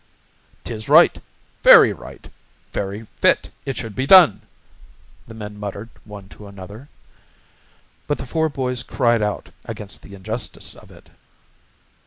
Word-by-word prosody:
"'Tis 110 Hz, -2 st, -7 dB
right." -, -, +6 dB, 0.4 s
"Very -, -, +8 dB
right." -, -, -13 dB, 0.5 s
"Very 100 Hz, +3 st, -4 dB
fit -, -, +2 dB, 0.2 s
it 135 Hz, -4 st, -3 dB
should 110 Hz, -4 st, -6 dB
be 130 Hz, +5 st, -2 dB
done," 170 Hz, -, +7 dB, 0.9 s
the 115 Hz, -, -11 dB
men 105 Hz, -1 st, -9 dB
muttered 105 Hz, +2 st, -6 dB, 0.2 s
one 105 Hz, -2 st, -11 dB
to 105 Hz, -, -13 dB
another. 100 Hz, +7 st, -12 dB, 1.2 s
But 145 Hz, -, -1 dB
the 135 Hz, -, -7 dB
four 160 Hz, +4 st, -1 dB
boys 125 Hz, -3 st, -3 dB
cried 120 Hz, -4 st, +1 dB
out 105 Hz, -1 st, -3 dB
against 100 Hz, -2 st, -7 dB
the 100 Hz, -, -13 dB
injustice 110 Hz, +3 st, -6 dB
of -, -, -17 dB
it. -, -, -18 dB
110 Hz, 135 wpm, -21 LUFS, 100-125 Hz, 1.2 s, Very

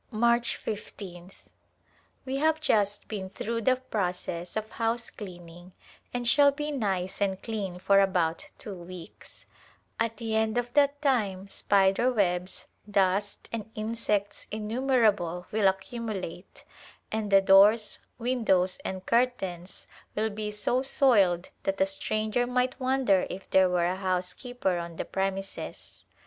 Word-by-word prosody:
March 235 Hz, +1 st, +1 dB
l^th. 190 Hz, -4 st, -7 dB, 0.8 s
We 265 Hz, +1 st, -2 dB
have 315 Hz, +2 st, +2 dB
just 205 Hz, -9 st, +1 dB
been 195 Hz, -3 st, -5 dB
through 230 Hz, +4 st, -3 dB
the 255 Hz, +3 st, +3 dB
process 180 Hz, -8 st, -3 dB
of 215 Hz, 0 st, -2 dB
house 230 Hz, +1 st, -1 dB
cleaning 175 Hz, -2 st, -11 dB, 0.4 s
and 245 Hz, -1 st, -2 dB
shall 285 Hz, +4 st, +6 dB
be 295 Hz, +2 st, -4 dB
nice 195 Hz, -9 st, -2 dB
and 190 Hz, -2 st, 0 dB
clean 200 Hz, -5 st, -4 dB
for 195 Hz, +2 st, +4 dB
about 180 Hz, -4 st, +1 dB
two 205 Hz, -, -7 dB
weeks; 180 Hz, -1 st, -11 dB, 0.5 s
at 230 Hz, -1 st, 0 dB
the 225 Hz, -1 st, -3 dB
end 220 Hz, +1 st, +1 dB
of 245 Hz, 0 st, -2 dB
that 285 Hz, 0 st, +3 dB
time 205 Hz, -9 st, +1 dB
spider 195 Hz, +5 st, +2 dB
webs, 185 Hz, -5 st, -1 dB, 0.2 s
dust, 200 Hz, 0 st, +1 dB
and 220 Hz, -2 st, -5 dB
insects 215 Hz, -2 st, -2 dB
innumerable 215 Hz, -6 st, +1 dB
will 210 Hz, -2 st, +3 dB
accumulate, 190 Hz, -2 st, -4 dB, 0.5 s
and 215 Hz, -2 st, -2 dB
the 195 Hz, -, +8 dB
doors, 200 Hz, +3 st, +5 dB, 0.2 s
windows 225 Hz, -7 st, +1 dB
and 190 Hz, 0 st, -5 dB
curtains 195 Hz, -8 st, -1 dB, 0.3 s
will 220 Hz, +1 st, 0 dB
be 210 Hz, 0 st, -4 dB
so 210 Hz, +4 st, 0 dB
soiled 205 Hz, -, +3 dB
that 195 Hz, 0 st, -2 dB
a 190 Hz, -, +5 dB
stranger 215 Hz, +4 st, -1 dB
might 250 Hz, +1 st, 0 dB
wonder 255 Hz, -7 st, +2 dB
if 185 Hz, +1 st, -7 dB
there 190 Hz, -1 st, +5 dB
were 175 Hz, -1 st, +2 dB
a 180 Hz, +1 st, 0 dB
housekeeper 185 Hz, +2 st, -2 dB
on 170 Hz, -1 st, -6 dB
the -, -, -4 dB
premises. 195 Hz, 0 st, -4 dB
205 Hz, 135 wpm, -28 LUFS, 185-235 Hz, 0.8 s, the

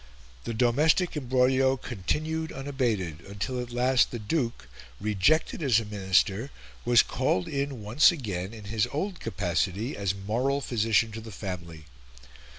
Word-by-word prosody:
The 115 Hz, -, -3 dB
domestic 150 Hz, +10 st, +3 dB
imbroglio 130 Hz, 0 st, +2 dB
continued 155 Hz, -, -3 dB
unabated, 120 Hz, -, -2 dB
until 100 Hz, +6 st, -4 dB
at 120 Hz, 0 st, -7 dB
last 125 Hz, +1 st, +3 dB
the 120 Hz, -, -5 dB
Duke, 115 Hz, -, -2 dB, 0.3 s
rejected 110 Hz, -, +1 dB
as 130 Hz, -7 st, +4 dB
a 115 Hz, -, -5 dB
Minister, 100 Hz, +3 st, +1 dB, 0.3 s
was 120 Hz, -1 st, +5 dB
called 125 Hz, -8 st, 0 dB
in 140 Hz, -5 st, -3 dB
once 110 Hz, -, +5 dB
again 100 Hz, -, -4 dB
in 110 Hz, -2 st, -10 dB
his 105 Hz, +1 st, 0 dB
old 185 Hz, +6 st, -3 dB
capacity 100 Hz, -, -1 dB
as 100 Hz, -1 st, -1 dB
moral 120 Hz, +8 st, 0 dB
physician 115 Hz, -3 st, +1 dB
to 110 Hz, +1 st, -7 dB
the 110 Hz, 0 st, -10 dB
family. 85 Hz, -5 st, -7 dB
115 Hz, 140 wpm, -27 LUFS, 100-135 Hz, 0.3 s, was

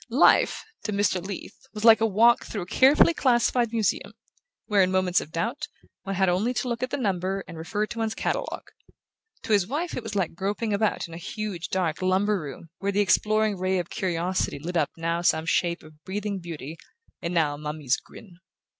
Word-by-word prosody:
Life, -, -, +4 dB, 0.2 s
to 215 Hz, -, -1 dB
Mr. 200 Hz, -3 st, +1 dB
Leath, 200 Hz, +6 st, -8 dB
was 210 Hz, +1 st, -3 dB
like 225 Hz, -1 st, +8 dB
a 225 Hz, -, +4 dB
walk 230 Hz, +4 st, +4 dB
through 205 Hz, -5 st, -5 dB
a -, -, -8 dB
carefully 275 Hz, -, +5 dB
classified 240 Hz, -4 st, +2 dB
museum, 225 Hz, -3 st, -1 dB, 0.5 s
where, 205 Hz, -2 st, +3 dB
in 185 Hz, -, +3 dB
moments 185 Hz, -1 st, +2 dB
of 155 Hz, -, -10 dB
doubt, 235 Hz, -, -2 dB, 0.3 s
one 195 Hz, +1 st, -4 dB
had 190 Hz, 0 st, +2 dB
only 200 Hz, +8 st, +1 dB
to 255 Hz, -, -1 dB
look 235 Hz, -1 st, -2 dB
at 255 Hz, -, -1 dB
the 285 Hz, -, -2 dB
number 195 Hz, -4 st, -1 dB
and 170 Hz, -, -9 dB
refer 205 Hz, +7 st, -2 dB
to 230 Hz, +2 st, -7 dB
one's 225 Hz, -1 st, -1 dB
catalogue; -, -, -3 dB, 0.7 s
to 220 Hz, -, 0 dB
his 200 Hz, -3 st, +3 dB
wife 315 Hz, +8 st, -3 dB
it -, -, -3 dB
was 220 Hz, -2 st, -6 dB
like 190 Hz, -5 st, 0 dB
groping 205 Hz, +5 st, -2 dB
about 210 Hz, -2 st, 0 dB
in 165 Hz, -, -12 dB
a -, -, -6 dB
huge 190 Hz, 0 st, -5 dB
dark 180 Hz, -3 st, -1 dB
lumber 195 Hz, +2 st, +2 dB
room 150 Hz, +3 st, -9 dB
where 200 Hz, 0 st, -1 dB
the 200 Hz, -, 0 dB
exploring 210 Hz, 0 st, +2 dB
ray 185 Hz, +1 st, +1 dB
of 175 Hz, -2 st, -3 dB
curiosity 180 Hz, -2 st, -1 dB
lit 170 Hz, +5 st, -6 dB
up 155 Hz, -4 st, +2 dB
now 165 Hz, +1 st, -1 dB
some 160 Hz, -2 st, +2 dB
shape 170 Hz, +1 st, 0 dB
of 155 Hz, 0 st, -17 dB
breathing 200 Hz, +1 st, -3 dB
beauty 165 Hz, -2 st, -8 dB, 0.4 s
and 170 Hz, -, -3 dB
now 155 Hz, -3 st, +2 dB
a -, -, -7 dB
mummy's 150 Hz, -3 st, -1 dB
grin. 190 Hz, -7 st, -14 dB
195 Hz, 205 wpm, -26 LUFS, 170-220 Hz, 0.7 s, like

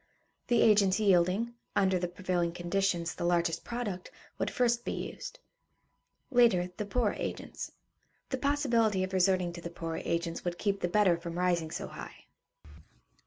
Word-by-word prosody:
The 240 Hz, -1 st, +4 dB
agents 200 Hz, -3 st, +5 dB
yielding, 195 Hz, +3 st, +3 dB, 0.2 s
under 190 Hz, -2 st, +3 dB
the 180 Hz, -, -1 dB
prevailing 175 Hz, -1 st, -1 dB
conditions, 175 Hz, -1 st, 0 dB
the -, -, -5 dB
largest 170 Hz, -1 st, +1 dB
product, 215 Hz, -7 st, -4 dB, 0.3 s
would -, -, 0 dB
first 240 Hz, -1 st, +1 dB
be -, -, -2 dB
used; -, -, -6 dB, 0.9 s
later, 230 Hz, -8 st, +4 dB
the 210 Hz, -, -3 dB
poorer 225 Hz, 0 st, +1 dB
agents. -, -, -5 dB, 0.6 s
The 260 Hz, -, -2 dB
possibility 235 Hz, -8 st, +2 dB
of 185 Hz, 0 st, -4 dB
resorting 185 Hz, -2 st, +2 dB
to 170 Hz, -, -8 dB
the 170 Hz, -, -5 dB
poorer 165 Hz, -1 st, -5 dB
agents 170 Hz, 0 st, -2 dB
would 175 Hz, -1 st, -2 dB
keep 200 Hz, 0 st, 0 dB
the 175 Hz, -, 0 dB
better 185 Hz, -2 st, +3 dB
from 170 Hz, 0 st, -6 dB
rising 175 Hz, -3 st, +1 dB
so -, -, -4 dB
high. -, -, -10 dB
185 Hz, 155 wpm, -31 LUFS, 175-215 Hz, 0.9 s, agents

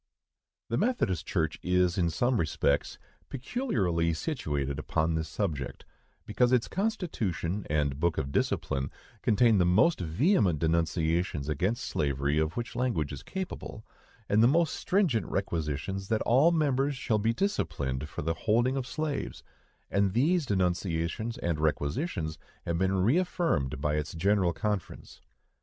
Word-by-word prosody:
The 115 Hz, -, 0 dB
Methodist 100 Hz, -, 0 dB
Church 80 Hz, -6 st, -1 dB
is, 90 Hz, -1 st, +2 dB
in 85 Hz, -3 st, +1 dB
some 120 Hz, +10 st, +1 dB
respects, 75 Hz, -3 st, 0 dB, 0.3 s
peculiarly 100 Hz, -, 0 dB
situated 75 Hz, -, -2 dB
upon 80 Hz, +1 st, 0 dB
this 80 Hz, 0 st, -2 dB
subject, 75 Hz, -11 st, -3 dB, 0.4 s
because 120 Hz, +4 st, +2 dB
its 125 Hz, -2 st, +3 dB
constitution 105 Hz, -, -2 dB
and 75 Hz, -2 st, 0 dB
book 85 Hz, -1 st, +1 dB
of 70 Hz, -, -2 dB
discipline 70 Hz, 0 st, -1 dB, 0.3 s
contain 110 Hz, -1 st, +4 dB
the -, -, +5 dB
most 130 Hz, -, +4 dB
vehement 95 Hz, -, +2 dB
denunciations 80 Hz, -1 st, 0 dB
against 95 Hz, -, -1 dB
slavery 70 Hz, +1 st, 0 dB
of 80 Hz, +4 st, -1 dB
which 120 Hz, 0 st, -4 dB
language 90 Hz, -, -1 dB
is 70 Hz, -, -7 dB
capable, 185 Hz, -, -6 dB, 0.4 s
and 105 Hz, +2 st, +3 dB
the 115 Hz, -, +7 dB
most 160 Hz, +4 st, +3 dB
stringent 165 Hz, -, +1 dB
requisitions 80 Hz, +5 st, -2 dB
that 110 Hz, 0 st, 0 dB
all 135 Hz, +8 st, +5 dB
members 140 Hz, -3 st, +1 dB
shall 110 Hz, -3 st, 0 dB
be 110 Hz, +2 st, +2 dB
disciplined 75 Hz, -, -2 dB
for -, -, -5 dB
the 80 Hz, +2 st, 0 dB
holding 120 Hz, +9 st, +1 dB
of 130 Hz, -1 st, -3 dB
slaves; 155 Hz, -2 st, -3 dB, 0.5 s
and 100 Hz, -1 st, +2 dB
these 150 Hz, -, +2 dB
denunciations 90 Hz, +3 st, -1 dB
and 85 Hz, -3 st, -2 dB
requisitions 80 Hz, -, -1 dB, 0.3 s
have 85 Hz, 0 st, -1 dB
been 95 Hz, +1 st, +2 dB
reäffirmed 150 Hz, -, +1 dB
by 75 Hz, +1 st, 0 dB
its 75 Hz, +2 st, -3 dB
General 95 Hz, +1 st, +2 dB
Conference. 105 Hz, +2 st, -4 dB
95 Hz, 140 wpm, -29 LUFS, 80-125 Hz, 0.5 s, the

